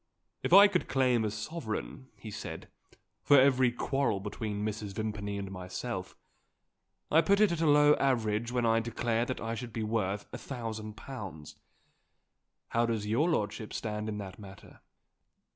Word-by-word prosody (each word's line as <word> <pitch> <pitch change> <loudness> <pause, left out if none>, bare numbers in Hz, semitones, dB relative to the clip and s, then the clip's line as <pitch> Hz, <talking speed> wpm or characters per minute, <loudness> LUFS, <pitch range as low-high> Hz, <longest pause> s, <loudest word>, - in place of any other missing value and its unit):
"If - - -2
I 200 +3 +10
could 185 -3 -1
claim 125 -4 +2
a 110 - 0
sovereign," 120 +2 -5
he 110 - -9
said, - - -7 0.5
"for 145 -1 +6
every 130 -2 +4
quarrel 120 -3 0
between 105 +1 -4
Mrs. 105 -2 -4
Vimpany 105 -2 -3
and 100 -1 -5
myself, 95 +1 -5 0.9
I 160 - +6
put 200 +5 +3
it 210 -4 +5
at 170 -1 -2
a 160 - +3
low 145 0 +6
average 115 -3 0
when 125 -1 0
I 115 0 +4
declare 115 0 -1
that 130 - -4
I 115 +1 -3
should 120 +1 -6
be 110 0 -3
worth 105 -2 -1
a - - -5
thousand 110 -4 -6
pounds. 95 - -8 1.2
How 115 0 +1
does 110 -3 -1
your 120 +11 +2
lordship 110 -7 -2
stand 105 -1 -3
in 105 - -3
that 95 -1 -7
matter? 95 -2 -13
115 Hz, 160 wpm, -30 LUFS, 105-130 Hz, 1.2 s, I